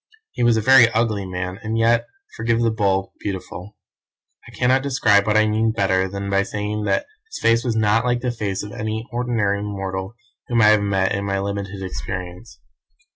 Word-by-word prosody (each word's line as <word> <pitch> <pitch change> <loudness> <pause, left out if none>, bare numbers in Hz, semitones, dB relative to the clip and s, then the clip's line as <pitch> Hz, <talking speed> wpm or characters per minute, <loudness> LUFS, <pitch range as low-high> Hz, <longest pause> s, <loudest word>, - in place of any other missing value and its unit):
He - - -6
was 120 -1 +4
a - - +1
very 125 0 +7
ugly 110 -4 0
man, 90 +1 -5
and 110 +1 -3
yet, 115 +1 +2 0.3
forgive 115 0 0
the 115 - +2
bull, 95 -3 0
beautiful. 100 0 -7 0.7
I - - -12
cannot 130 +2 +2
describe 125 -7 +2
what 105 0 +3
I 110 - +4
mean 110 +1 +1
better 95 -2 +1
than 100 +1 -5
by 100 0 +2
saying 105 +1 -3
that 100 -1 0 0.2
his - - -7
face 115 +1 +3
was 120 -3 -1
not 110 +1 +2
like 120 -1 0
the 125 -1 -1
face 105 -5 -3
of 105 - -8
any 110 +2 -4
ordinary 115 -5 0
mortal 95 0 -5 0.3
whom 120 -1 +1
I 105 - +7
have 105 -1 +4
met 95 -2 0
in 100 - -2
my 100 -1 -1
limited 100 0 -4
experience. 90 0 -7
105 Hz, 190 wpm, -21 LUFS, 100-115 Hz, 0.7 s, very